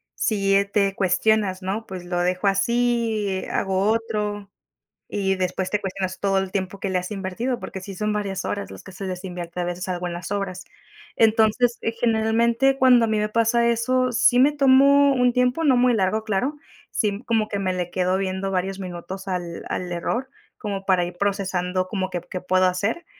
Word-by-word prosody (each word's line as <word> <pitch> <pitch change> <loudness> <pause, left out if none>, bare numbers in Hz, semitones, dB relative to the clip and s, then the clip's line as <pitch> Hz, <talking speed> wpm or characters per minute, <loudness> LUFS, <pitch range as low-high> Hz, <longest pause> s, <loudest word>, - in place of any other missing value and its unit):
si, 200 -2 +1
eh, 200 - +2
te 200 -1 0
cuestionas 195 0 +1
¿no?: 195 +4 -3
"¿Pues 185 -2 -7
lo 175 0 -2
dejo 180 +2 0
así, 220 -1 +1
hago 190 -1 0
otro?", 210 -3 -2 0.6
y 195 -1 0
después 185 0 -2
te 210 - 0
cuestionas 185 -1 -4
todo 195 -1 +1
el 190 -1 -3
tiempo 190 0 -3
que 195 - -3
le 185 - 0
has 180 +2 -4
invertido, 210 +6 -3
porque 190 0 -7
sí 195 +1 -8
son 210 +3 -2
varias 200 -2 -3
horas 200 -1 -4
las - - -10
que 190 - -11
se 195 +2 -7
les 185 0 -5
invierte 180 -2 -6
a - - 0
veces 175 +1 -4
algo 180 -1 -3
en 175 - -5
las 175 +3 -7
obras. 195 -2 -3 0.5
Entonces, 225 +2 +3
eh, 225 - -1
generalmente 235 +4 +2
cuando 250 -3 +6
a - - -3
mí 220 -1 +1
me 210 0 0
pasa 230 +1 +2
eso, 255 +2 +1
sí 245 +1 +4
me 275 +3 +6
tomo 280 0 +5
un 250 -1 +3
tiempo, 250 +5 +1
no 270 -5 +4
muy 245 0 +4
largo, 215 +1 +1
claro. 220 +7 -1 0.3
Sí, 205 -2 -1
como 225 -2 +1
que 200 - -3
me 190 -1 0
le 180 -1 -3
quedo 185 +1 +1
viendo 190 0 -2
varios 190 +1 -2
minutos 185 +1 -7
al 175 -2 -4
al 180 -1 -3
error, 240 +9 -2 0.3
como 200 -3 -4
para 185 -2 +3
ir 175 - -6
procesando 185 -2 -1
como 190 -1 -2
que 175 -2 -4
p - - -24
qué 185 - -4
puedo 185 0 +2
hacer, 200 - -1
200 Hz, 200 wpm, -23 LUFS, 185-225 Hz, 0.6 s, cuando